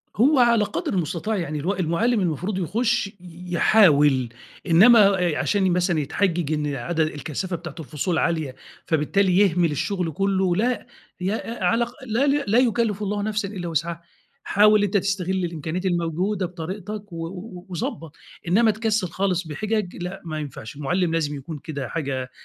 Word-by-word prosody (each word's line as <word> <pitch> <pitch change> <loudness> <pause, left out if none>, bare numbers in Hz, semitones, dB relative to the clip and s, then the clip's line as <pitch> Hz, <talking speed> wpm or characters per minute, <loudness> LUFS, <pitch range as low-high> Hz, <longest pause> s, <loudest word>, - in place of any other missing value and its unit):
هو 265 +5 +4
على 235 -3 +5
قدْر - - -3
المُستطاع 180 +4 -1
يعني 155 -4 -3
ال 190 +7 -2
المُعلِّم 195 +8 +1
المفروض 185 +2 -1
يخُش 225 +5 0
ي - - -11 0.4
يحاول، 145 - +4 0.4
إنما 220 +8 +7 0.4
علشان 190 -3 +1
مثلًا 175 -2 +1
يتحجِّج 165 +1 0
إن 150 -2 -1
عد 135 +7 -4
الكثافة 155 +4 -2
بتاعتة 170 -2 -8
الفصول 155 +3 -2
عالية 160 -6 -1 0.3
فبالتالي 180 +4 +2
يهمِل 180 -4 +3
الشغل 180 +3 -2
كلّه 190 +1 +1
لأ، 240 +5 0 0.3
ي 190 +3 0
أ 225 -1 -5
على 180 +4 +3
الأق 240 +1 -6
لا 240 +4 +1
"لا 275 -6 +2
يُكلِّف 230 -4 +1
الله 205 0 -1
نفسًا 210 -1 -1
إلا 185 -3 -6
وِسْعها" 170 +1 -2 0.4
حاول 210 +1 +4
أنت 205 0 +2
تستغِل 190 -2 -1
الإمكانيات 170 +2 -4
الموجودة 180 +3 0
بطريقتك 190 +4 -7
و 165 0 -4
و 180 0 -9
وضبّط، 165 -2 -5 0.3
إنما 220 +6 +4
تكسّل 215 -2 0
خالص 185 0 -1
بحجَج، 210 +4 -2
لأ 180 +2 -6
ما 155 -2 -4
ينفعش، 140 -6 -7
المُعلِّم 165 +5 0
لازم 150 -3 0
يكون 145 +3 -7
كده 140 -5 -5
حاجة، 135 -5 -3
180 Hz, 155 wpm, -23 LUFS, 160-205 Hz, 0.4 s, إنما